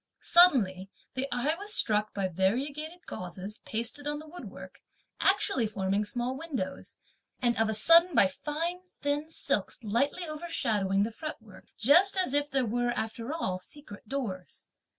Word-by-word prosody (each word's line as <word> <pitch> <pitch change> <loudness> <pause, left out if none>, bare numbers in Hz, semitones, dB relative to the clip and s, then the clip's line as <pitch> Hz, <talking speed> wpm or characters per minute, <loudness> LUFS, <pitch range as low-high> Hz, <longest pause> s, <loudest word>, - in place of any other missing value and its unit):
Suddenly 210 - +5 0.2
(the 260 +1 -1
eye 245 +5 +1
was 415 +1 -2
struck) 210 -1 +2
by 195 -2 -1
variegated 280 - -2
gauzes 185 +4 -3
pasted 235 +6 -3
(on 295 0 -2
the 305 - -9
wood 350 +3 -10
work), - - -11 0.4
actually 385 - +3
forming 200 0 -1
small 245 +4 -2
windows; 265 - -5 0.4
and 240 -2 +1
of 225 0 +2
a 220 - -1
sudden 335 - +6
by 225 - +7
fine 315 - -3 0.2
thin 290 +2 -1
silks 295 - -2
lightly 275 - 0
overshadowing 220 - 0
(the 225 - -2
fretwork) 225 - -9
just 350 - +5
as 365 -8 +2
if 290 0 +2
there 265 -3 +1
were, 245 +2 0
after 225 +3 -4
all, 190 - -2
secret 205 +1 -13
doors. 215 -10 -5
245 Hz, 150 wpm, -29 LUFS, 210-305 Hz, 0.4 s, by